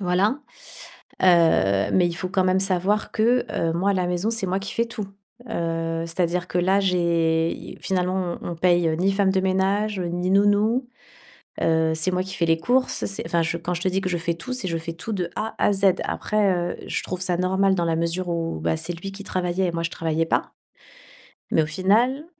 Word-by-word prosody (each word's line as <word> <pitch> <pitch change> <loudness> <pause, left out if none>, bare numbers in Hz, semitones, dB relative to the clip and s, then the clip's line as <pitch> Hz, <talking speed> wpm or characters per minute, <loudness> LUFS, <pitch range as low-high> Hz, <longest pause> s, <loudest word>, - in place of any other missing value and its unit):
Voilà, 195 +7 +1 0.8
heu, 160 - +4
mais 180 -2 +4
il 170 - -4
faut 180 +2 -4
quand 185 0 +1
même 185 +1 +2
savoir 195 +2 0
que, 235 +3 +2
heu, 165 - 0
moi 190 +4 +1
à - - +3
la 185 -2 0
maison 180 +5 -1
c'est 225 -4 -1
moi 185 +1 0
qui 195 - -6
fais 230 - 0
tout, 215 -3 -5 0.4
heu, 165 -3 -2
c'est 165 +2 -5
à 175 - +4
dire 175 +1 -3
que - - -3
là, 190 +3 +3
j'ai 170 -3 +1
i - - -9
finalement 185 -1 -1
on - - -5
on - - -5
paye, 175 -1 +3
heu, 160 - 0
ni 190 +4 +2
femme 195 -1 +2
de 190 0 +1
ménage, 190 +2 0
heu, 175 - -2
ni 175 +2 -2
nounou, 205 +5 +3 0.7
heu, 160 0 +2
c'est 160 +4 +1
moi 180 0 0
qui 190 0 -8
fais 170 - 0
les 165 0 +3
courses. 250 +10 0
C'est 200 - -3
enfin 170 0 +1
je 165 +1 -1
quand 170 +1 -3
je 175 - -5
te - - +1
dis 190 +1 -1
que 185 - -2
je 175 - 0
fais 170 0 -1
tout, 170 +9 -6
c'est 250 -7 -2
je 165 -2 -1
fais 165 +1 -6
tout 180 +7 -6
de 180 -4 -2
A 220 - -3
à - - +3
Z. 200 0 +1 0.2
Après 210 -3 0
heu, 175 0 -2
je - - -2
trouve 185 -1 -5
ça 180 -1 +1
normal 190 +2 +2
dans 175 -2 0
la 165 -1 +1
mesure 170 +2 0
où, 165 - -2
bah 80 0 0
c'est 175 - -3
lui 175 +4 -7
qui 200 +1 -9
travaillait 185 0 -1
et - - -1
moi 165 0 -3
je 165 - -2
travaillais 165 0 -1
pas. - - -1 1.0
Mais 160 - +3
au - - -2
final 230 - +1
180 Hz, 235 wpm, -23 LUFS, 170-195 Hz, 1.0 s, heu